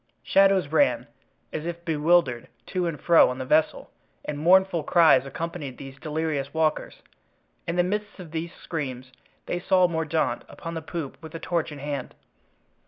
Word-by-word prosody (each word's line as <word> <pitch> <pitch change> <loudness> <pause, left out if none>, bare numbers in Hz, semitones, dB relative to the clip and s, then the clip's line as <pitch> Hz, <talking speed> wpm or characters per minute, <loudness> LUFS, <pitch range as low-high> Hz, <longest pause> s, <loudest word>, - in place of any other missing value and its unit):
Shadows 195 -5 +4
ran, 280 - +2 0.5
as 155 +1 -4
if 170 0 -6
bewildered, 155 -6 +2 0.2
to 180 -2 -2
and 160 -3 -4
fro 170 -1 +5
on 125 - -4
the 130 - -4
vessel, 155 +4 +1 0.3
and 145 -1 -4
mournful 180 +1 +4
cries 155 -4 +4
accompanied 150 -2 -5
these 135 0 -10
delirious 155 -2 -3
walkers. 160 -1 -1 0.6
In 170 - -1
the 175 - +3
midst 205 +3 -3
of 170 -4 -10
these 165 +1 -4
screams 130 -8 -6 0.3
they 175 - -2
saw 185 0 +3
Mordaunt 160 -1 -1
upon 165 - -7
the 165 - -4
poop 160 -3 -6
with 160 0 -10
a - - -4
torch 170 -2 -2
in 150 - -8
hand. 140 -2 -5
160 Hz, 165 wpm, -25 LUFS, 145-175 Hz, 0.6 s, fro